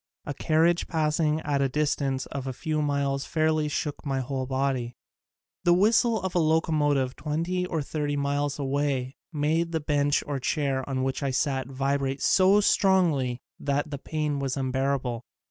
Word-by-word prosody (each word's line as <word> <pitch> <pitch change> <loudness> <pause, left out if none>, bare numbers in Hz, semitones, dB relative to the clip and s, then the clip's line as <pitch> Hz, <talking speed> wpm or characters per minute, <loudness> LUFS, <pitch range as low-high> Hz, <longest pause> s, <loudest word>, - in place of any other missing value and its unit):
A 145 - -3
carriage 165 +4 +2
passing 155 -1 +1
at 140 -2 0
a 135 - +2
distance 140 -2 0
of 135 -1 -6
a 130 - -3
few 155 +4 -2
miles 140 -1 0
fairly 155 -1 +1
shook 150 0 -3
my 135 -2 -1
whole 130 0 -3
body. 130 -2 -1 0.7
The 175 -1 +5
whistle 220 +4 +3
of 190 -1 -2
a 175 - +2
locomotive 150 -5 +1
twenty 170 +4 -2
or 160 -4 -2
thirty 145 0 -2
miles 145 0 -1
away 140 -2 -1 0.2
made 160 +2 0
the 160 - +1
bench 145 -1 +1
or 145 -2 -3
chair 135 -1 0
on 130 -1 -1
which 135 +1 -2
I 140 - 0
sat 130 0 0
vi 135 +1 0
brate 135 0 -2
so 195 +2 +5
strongly 165 -12 +2 0.2
that 145 +2 -1
the 140 - -4
pain 150 -1 -2
was 135 -2 -2
unbear 135 +1 0
able. 125 -3 -4
145 Hz, 170 wpm, -26 LUFS, 135-155 Hz, 0.7 s, The